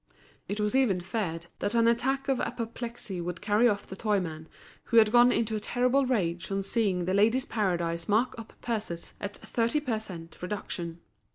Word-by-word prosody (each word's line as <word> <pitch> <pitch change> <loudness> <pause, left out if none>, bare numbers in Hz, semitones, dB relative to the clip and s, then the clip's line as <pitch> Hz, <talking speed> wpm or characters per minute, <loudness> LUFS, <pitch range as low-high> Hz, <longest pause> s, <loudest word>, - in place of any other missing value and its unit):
It 205 +2 -3
was 210 +3 +1
even 240 -9 +3
feared 175 -3 -3
that 205 +3 -1
an 230 0 +5
attack 260 +4 +1
of 270 -2 +1
apoplexy 230 -4 -4
would 175 0 -4
carry 215 +3 +3
off 200 -2 -1
the 190 - -8
toyman, 180 -7 -1 0.4
who 230 - +1
had 220 -2 +7
gone 240 +1 +7
into 225 -2 0
a - - -1
terrible 250 +5 +2
rage 180 -8 0
on 195 0 0
seeing 195 -4 +1
The 185 - 0
Ladies' 225 +7 +3
Paradise 170 -5 -1
mark 225 +5 +3
up 225 - -9
purses 210 -8 -4
at 200 0 -4
thirty 235 +5 0
per 250 -7 -1
cent. 170 -6 -9
reduction. 175 -3 -4
210 Hz, 180 wpm, -29 LUFS, 180-235 Hz, 0.4 s, had